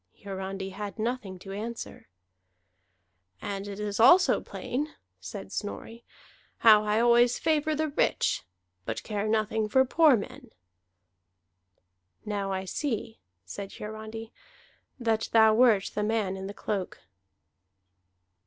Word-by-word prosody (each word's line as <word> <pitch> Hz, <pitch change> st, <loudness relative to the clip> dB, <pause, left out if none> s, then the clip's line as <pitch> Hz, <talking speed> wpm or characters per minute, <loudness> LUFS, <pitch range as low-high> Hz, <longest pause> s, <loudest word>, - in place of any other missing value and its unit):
Hiarandi 195 Hz, 0 st, -5 dB
had 200 Hz, 0 st, -6 dB
nothing 220 Hz, -4 st, -3 dB
to 195 Hz, +2 st, -10 dB
answer. 225 Hz, +4 st, -6 dB, 1.3 s
"And 200 Hz, 0 st, -5 dB
it 200 Hz, 0 st, -7 dB
is 210 Hz, 0 st, -3 dB
also 345 Hz, +11 st, +6 dB
plain," 290 Hz, +5 st, -4 dB, 0.2 s
said 95 Hz, +2 st, -8 dB
Snorri, 225 Hz, +3 st, -6 dB, 0.5 s
"how 215 Hz, -2 st, +7 dB
I 210 Hz, +1 st, +1 dB
always 240 Hz, +1 st, +4 dB
favor 310 Hz, -1 st, +1 dB
the 310 Hz, +1 st, -1 dB
rich, 285 Hz, -, +1 dB, 0.4 s
but 115 Hz, +3 st, -4 dB
care 210 Hz, 0 st, -2 dB
nothing 215 Hz, 0 st, 0 dB
for 265 Hz, +4 st, +4 dB
poor 300 Hz, 0 st, +5 dB
men." 255 Hz, +4 st, -8 dB, 1.8 s
"Now 200 Hz, -2 st, -2 dB
I 190 Hz, 0 st, -2 dB
see," 225 Hz, 0 st, -3 dB, 0.3 s
said 195 Hz, -, -7 dB
Hiarandi, 220 Hz, +1 st, -8 dB, 0.7 s
"that 225 Hz, -2 st, 0 dB
thou 220 Hz, -1 st, +7 dB
wert 220 Hz, -4 st, +4 dB
the 210 Hz, -, -1 dB
man 210 Hz, -3 st, 0 dB
in 190 Hz, 0 st, -6 dB
the 200 Hz, -, -6 dB
cloak." 195 Hz, -3 st, -4 dB
215 Hz, 120 wpm, -28 LUFS, 200-235 Hz, 1.8 s, how